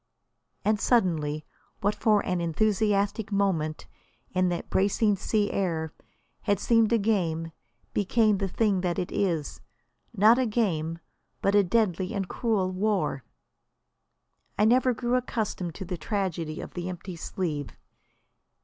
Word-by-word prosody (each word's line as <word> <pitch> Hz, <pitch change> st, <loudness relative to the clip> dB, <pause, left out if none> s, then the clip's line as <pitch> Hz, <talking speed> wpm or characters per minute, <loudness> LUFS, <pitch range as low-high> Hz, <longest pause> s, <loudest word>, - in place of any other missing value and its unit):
And 215 Hz, 0 st, +2 dB
suddenly 155 Hz, -11 st, +1 dB, 0.4 s
what 205 Hz, 0 st, +2 dB
for 210 Hz, -2 st, +2 dB
an 180 Hz, -2 st, -1 dB
enthusiastic 205 Hz, +4 st, +1 dB
moment, 180 Hz, -6 st, 0 dB, 0.5 s
in 185 Hz, -1 st, +2 dB
that 175 Hz, -1 st, -3 dB
bracing 205 Hz, +2 st, +2 dB
sea 205 Hz, +1 st, 0 dB
air, 165 Hz, -5 st, -1 dB, 0.5 s
had 205 Hz, -2 st, +1 dB
seemed 230 Hz, 0 st, +3 dB
a 235 Hz, -, +5 dB
game, 170 Hz, -7 st, 0 dB, 0.4 s
became 210 Hz, 0 st, +2 dB
the 195 Hz, -, 0 dB
thing 195 Hz, 0 st, +1 dB
that 175 Hz, -2 st, -1 dB
it 180 Hz, -, -2 dB
is, 170 Hz, -7 st, -1 dB, 0.5 s
not 225 Hz, +2 st, +5 dB
a 255 Hz, -, +2 dB
game, 165 Hz, -8 st, 0 dB, 0.4 s
but 200 Hz, -, +1 dB
a 205 Hz, 0 st, +6 dB
deadly 190 Hz, 0 st, 0 dB
and 195 Hz, -2 st, -2 dB
cruel 205 Hz, -5 st, 0 dB
war. 190 Hz, -, 0 dB, 1.3 s
I 210 Hz, -, +4 dB
never 255 Hz, +3 st, +4 dB
grew 240 Hz, +1 st, -2 dB
accustomed 220 Hz, -8 st, -2 dB
to 190 Hz, -, -6 dB
the 180 Hz, 0 st, -4 dB
tragedy 170 Hz, -5 st, -2 dB
of -, -, -9 dB
the 175 Hz, 0 st, -4 dB
empty 180 Hz, 0 st, -7 dB
sleeve. 160 Hz, -4 st, -3 dB
195 Hz, 135 wpm, -27 LUFS, 175-215 Hz, 1.3 s, a